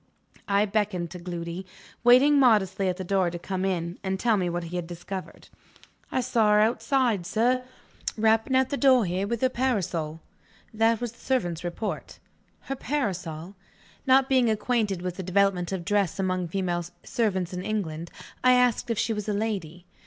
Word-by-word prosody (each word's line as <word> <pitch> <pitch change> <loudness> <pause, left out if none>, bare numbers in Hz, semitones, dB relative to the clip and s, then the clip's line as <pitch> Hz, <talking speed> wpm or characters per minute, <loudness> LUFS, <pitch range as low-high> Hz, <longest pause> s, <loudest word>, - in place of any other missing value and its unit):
I 200 0 +3
beckoned 200 -5 -1
to 180 - -7
Gloody, 170 0 -5 0.4
waiting 265 +4 +6
modestly 195 -6 +3
at 180 - -2
the 190 - -4
door, 185 -1 +1
to 175 - -5
come 185 +2 -4
in, 175 -2 -2
and 190 -1 -2
tell 230 0 +3
me 180 -3 0
what 175 0 -3
he 170 +1 -7
had 175 -1 -4
discovered. 180 +2 -8 0.6
"I 255 - +1
saw 230 -4 +2
her 210 - +5
outside, 230 -1 +2
sir 250 +3 +1 0.5
rapping 225 +4 +2
at 260 0 +2
the 280 - 0
door 260 -5 +5
here, 185 +3 -1
with 235 +1 -2
her 260 - +3
parasol." 185 -12 -1 0.5
That 225 +1 +2
was 240 -2 -3
the 235 - -23
servant's 175 -11 -1
report. 175 +5 -4 0.4
Her 270 - -4
parasol? 185 - -3 0.5
Not 265 0 +5
being 255 -3 +3
acquainted 215 -4 0
with 180 -1 -4
the - - -3
development 185 -1 +1
of 185 -3 -4
dress 200 -3 +1
among 185 -2 -1
female 175 -1 -1 0.2
servants 190 -6 -1
in 180 - -3
England, 170 -6 -3 0.3
I 255 0 +6
asked 250 -2 +2
if 230 - 0
she 230 0 0
was 210 0 -4
a - - +1
lady. 190 -5 -3
200 Hz, 175 wpm, -26 LUFS, 180-235 Hz, 0.6 s, waiting